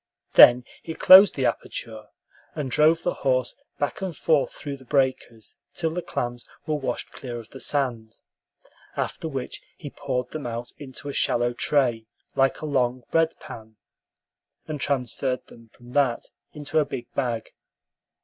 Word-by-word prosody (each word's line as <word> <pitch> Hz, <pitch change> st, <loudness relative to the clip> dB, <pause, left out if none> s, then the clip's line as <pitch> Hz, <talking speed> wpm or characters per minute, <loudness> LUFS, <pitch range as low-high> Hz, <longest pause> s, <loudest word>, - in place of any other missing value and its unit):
Then 125 Hz, 0 st, +9 dB, 0.2 s
he 160 Hz, -, -6 dB
closed 190 Hz, +1 st, +8 dB
the 135 Hz, -, 0 dB
aperture, 110 Hz, -3 st, -3 dB, 0.5 s
and 145 Hz, -5 st, -3 dB
drove 160 Hz, +4 st, +4 dB
the 175 Hz, -, 0 dB
horse 130 Hz, -2 st, 0 dB, 0.2 s
back 145 Hz, -, -2 dB
and 185 Hz, -5 st, -4 dB
forth 155 Hz, -4 st, +2 dB
through 140 Hz, -2 st, -7 dB
the 130 Hz, -, -16 dB
breakers 130 Hz, -5 st, -1 dB, 0.2 s
till 160 Hz, -1 st, -1 dB
the 180 Hz, +2 st, -3 dB
clams 120 Hz, -6 st, -4 dB, 0.2 s
were 155 Hz, -, -1 dB
washed 135 Hz, -5 st, -3 dB
clear 120 Hz, -3 st, -7 dB
of 115 Hz, -1 st, -11 dB
the 135 Hz, -, -10 dB
sand, 120 Hz, -6 st, -2 dB, 0.8 s
after -, -, -3 dB
which 135 Hz, -5 st, -5 dB, 0.2 s
he 145 Hz, -5 st, -8 dB
poured 125 Hz, -3 st, -3 dB
them 150 Hz, -5 st, -5 dB
out 120 Hz, +1 st, -5 dB
into 140 Hz, 0 st, -8 dB
a 140 Hz, -, -4 dB
shallow 120 Hz, -1 st, +1 dB
tray 120 Hz, -4 st, +1 dB, 0.3 s
like 135 Hz, 0 st, +1 dB
a -, -, -4 dB
long 130 Hz, -4 st, 0 dB
bread 165 Hz, 0 st, +2 dB
pan, 110 Hz, -1 st, -11 dB, 0.9 s
and 150 Hz, -3 st, -5 dB
transferred 130 Hz, -1 st, -1 dB
them 115 Hz, -1 st, -17 dB
from 120 Hz, 0 st, -16 dB
that 130 Hz, -3 st, +1 dB, 0.4 s
to 155 Hz, +2 st, +1 dB
a -, -, +4 dB
big 125 Hz, -3 st, -6 dB
bag. 120 Hz, -5 st, -2 dB
130 Hz, 160 wpm, -25 LUFS, 120-145 Hz, 0.9 s, Then